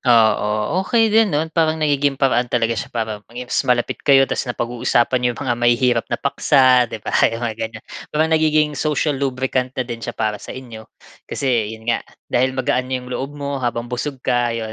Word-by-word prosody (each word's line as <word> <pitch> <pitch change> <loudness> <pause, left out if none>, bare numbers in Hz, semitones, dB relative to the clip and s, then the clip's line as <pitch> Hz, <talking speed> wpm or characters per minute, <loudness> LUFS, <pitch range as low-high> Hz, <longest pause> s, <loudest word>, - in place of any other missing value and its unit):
Oo, 110 - +2
okey 225 +2 +2
din 220 -1 +5
'no. 150 -1 0
Parang 160 -1 +2
nagiging 145 -3 +1
paraan 125 -3 +1
talaga 115 -1 +1
siya 110 - -4
para 110 -3 -4
maging 125 +1 -8
mas - - +3
malapit 120 -1 +1
kayo 135 -1 +5
tas 130 - -3
napag-uusapan 120 +1 0
n'yo 125 - +2
'yong - - -9
mga 120 -2 +1
mahihirap 120 0 +3
na 120 - -1
paksa 130 -3 +3
'di 110 - -8
ba - - -4
mga 115 0 +1
ganyan 110 -1 -5 0.2
parang 160 +1 0
nagiging 155 -1 +3
social 150 +1 0
lubricant 130 -1 -1
na 130 - -1
din 120 -1 -6
siya - - -6
para 110 -2 -1
sa - - -8
inyo. 115 -4 -10 0.4
Kasi 115 -5 -1
'yon 110 - -17
nga 120 0 0 0.3
dahil 130 +1 +1
magaan 130 -1 0
na 130 - -1
'yong 125 0 -8
loob 140 +3 -4
mo 140 -1 -4
habang 120 0 -3
busog 135 +3 -3
ka, 120 -1 +1
ayun, 110 -1 -5
125 Hz, 200 wpm, -20 LUFS, 115-140 Hz, 0.4 s, din